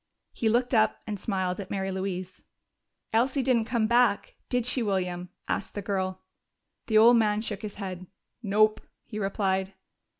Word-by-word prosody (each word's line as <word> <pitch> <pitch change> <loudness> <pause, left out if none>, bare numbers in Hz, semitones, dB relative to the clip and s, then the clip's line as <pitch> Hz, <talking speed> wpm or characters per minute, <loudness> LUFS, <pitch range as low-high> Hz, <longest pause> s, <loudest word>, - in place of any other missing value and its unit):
He 225 - 0
looked 245 +3 +1
up 220 -1 +3
and 210 -2 -4
smiled 185 -3 -1
at 195 -1 -6
Mary 195 -1 -2
Louise. 185 -1 -4 0.7
"Elsie 255 +4 +2
didn't 240 -3 +2
come 230 -1 +1
back, 240 -1 +2 0.2
did 245 -2 0
she, 250 0 +1
William?" 180 -4 -1 0.2
asked - - -3
the 205 - -2
girl. 185 -2 -2 0.6
The 220 - +3
old 235 +2 +8
man 210 -1 +2
shook 210 -3 -5
his 210 -2 -6
head. 185 -2 -6 0.3
"Nope," 215 0 +3 0.2
he 215 - -6
replied. 195 -1 -1
210 Hz, 160 wpm, -27 LUFS, 190-230 Hz, 0.7 s, old